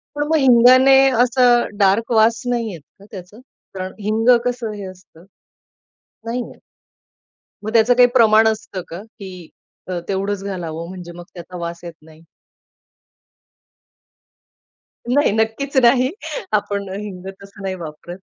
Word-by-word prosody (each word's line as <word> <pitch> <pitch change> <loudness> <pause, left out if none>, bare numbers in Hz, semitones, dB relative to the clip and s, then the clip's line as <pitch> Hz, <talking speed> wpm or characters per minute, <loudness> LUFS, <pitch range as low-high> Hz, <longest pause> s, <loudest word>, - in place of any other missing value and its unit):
पण 295 - -1
मग 320 - +1
हिंगाने 255 0 +6 0.3
असं 245 -3 +2
डार्क 205 +3 +1
वास 225 0 +3
नाही 235 -3 -2
येत 170 -5 -10 0.2
का 200 - -16
त्याचं, 190 +2 -11 0.3
कारण 185 -1 -6
हिंग 215 +3 0 0.2
कसं 245 -3 -3
हे 205 -1 -8
असतं? 185 -3 -14 1.0
नाही 235 +2 -3
येत. - - -17 1.0
मग 215 - -4
त्याचं 230 +1 +4
काही 245 0 +5
प्रमाण 220 -2 +5
असतं 215 -3 -3
का 170 +3 -8
की 190 -6 -12 0.4
अ, 180 -1 -3
तेवढंच 195 0 -3
घालावं 170 -4 -6
म्हणजे 180 -2 -9
मग 175 0 -11
त्याचा 180 0 -10
वास 170 0 -7
येत 170 -1 -8
नाही? 160 +1 -18 2.9
नाही, 285 0 +2
नक्कीच 225 +6 -2
नाही, 250 +2 +4 0.4
आपण 205 -1 -1
अ, 190 - -6
हिंग 190 -3 -9 0.2
तसं 200 +1 -14
नाही 190 -1 -3
वापरत. 170 +1 -10
205 Hz, 140 wpm, -19 LUFS, 185-235 Hz, 2.9 s, हिंगाने